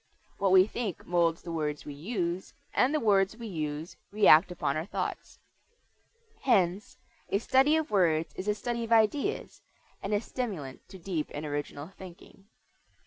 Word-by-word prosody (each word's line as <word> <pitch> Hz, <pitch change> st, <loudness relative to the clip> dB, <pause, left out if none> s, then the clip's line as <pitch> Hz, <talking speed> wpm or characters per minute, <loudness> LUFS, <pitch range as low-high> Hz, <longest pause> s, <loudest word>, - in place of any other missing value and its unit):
What 195 Hz, -1 st, +2 dB
we 185 Hz, 0 st, +7 dB
think 215 Hz, -3 st, -4 dB
molds 170 Hz, -1 st, +1 dB
the 170 Hz, -, -6 dB
words 150 Hz, -2 st, -3 dB
we 145 Hz, -, -6 dB
use, 175 Hz, +2 st, -3 dB, 0.2 s
and 255 Hz, -, +3 dB
the 305 Hz, -, +1 dB
words 200 Hz, -2 st, +2 dB
we 235 Hz, -, -8 dB
use 155 Hz, -4 st, -4 dB
react 195 Hz, -4 st, +6 dB
upon 170 Hz, -5 st, -1 dB
our 155 Hz, +3 st, -3 dB
thoughts. -, -, -4 dB, 1.0 s
Hence 195 Hz, -5 st, +1 dB, 0.3 s
a -, -, +2 dB
study 265 Hz, +7 st, +3 dB
of 315 Hz, -5 st, -1 dB
words 165 Hz, -5 st, +2 dB
is 190 Hz, -, -6 dB
a 210 Hz, -, +2 dB
study 235 Hz, +2 st, -3 dB
of 230 Hz, -, -6 dB
ideas, 230 Hz, -, +1 dB, 0.4 s
and 195 Hz, -, -4 dB
a 205 Hz, -, +3 dB
stimulant 195 Hz, -, -6 dB
to 190 Hz, -, -10 dB
deep 170 Hz, -4 st, -3 dB
and 150 Hz, +2 st, -4 dB
original 145 Hz, +1 st, -4 dB
thinking. 190 Hz, +1 st, -13 dB
190 Hz, 160 wpm, -29 LUFS, 160-220 Hz, 1.0 s, we